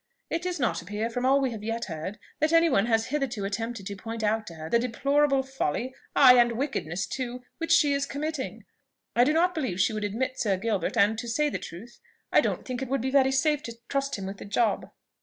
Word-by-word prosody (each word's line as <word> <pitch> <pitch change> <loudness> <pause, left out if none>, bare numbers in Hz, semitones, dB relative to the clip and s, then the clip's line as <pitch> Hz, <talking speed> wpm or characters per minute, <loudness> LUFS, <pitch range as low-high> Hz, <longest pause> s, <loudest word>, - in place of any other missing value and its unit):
It 330 - 0
does 360 -2 -3
not 190 -10 0
appear, 210 +6 -3
from 245 +2 -1
all 275 +1 +5
we 265 -2 0
have 215 -2 -7
yet 230 +1 -2
heard, 165 +4 -5 0.2
that 310 +1 +2
any 330 -1 +5
one 220 -3 +3
has 225 -1 +1
hitherto 255 -8 -1
attempted 225 +1 -4
to 200 0 -5
point 225 +2 -6
out 215 +1 0
to 165 - -8
her 160 0 -7
the 235 - +3
deplorable 275 +3 +2
folly, 260 - -2 0.2
ay, 250 -3 +8
and 240 0 +4
wickedness 225 - -2
too, 250 -1 -5 0.2
which 330 0 -2
she 315 -4 +5
is 280 0 0
committing. 300 -1 -4 0.5
I 240 - +6
do 280 - +3
not 345 +3 +3
believe 255 - -2
she 200 - +3
would 215 -1 -3
admit 255 +5 -2
Sir 205 -7 +1
Gilbert; 210 +1 -1
and, 215 +1 +3
to 235 - -5
say 295 +6 +1
the - - -3
truth, 215 +8 -10 0.3
I - - +6
don't - - -2
think 255 -1 -4
it 265 - -3
would 275 -2 0
be 265 +2 -1
very 265 -1 +4
safe 295 +2 +2
to 235 -3 -8
trust 275 -2 -1
him 195 - -5
with 195 +1 -6
the - - -9
job." 210 +1 0
240 Hz, 235 wpm, -27 LUFS, 215-275 Hz, 0.5 s, ay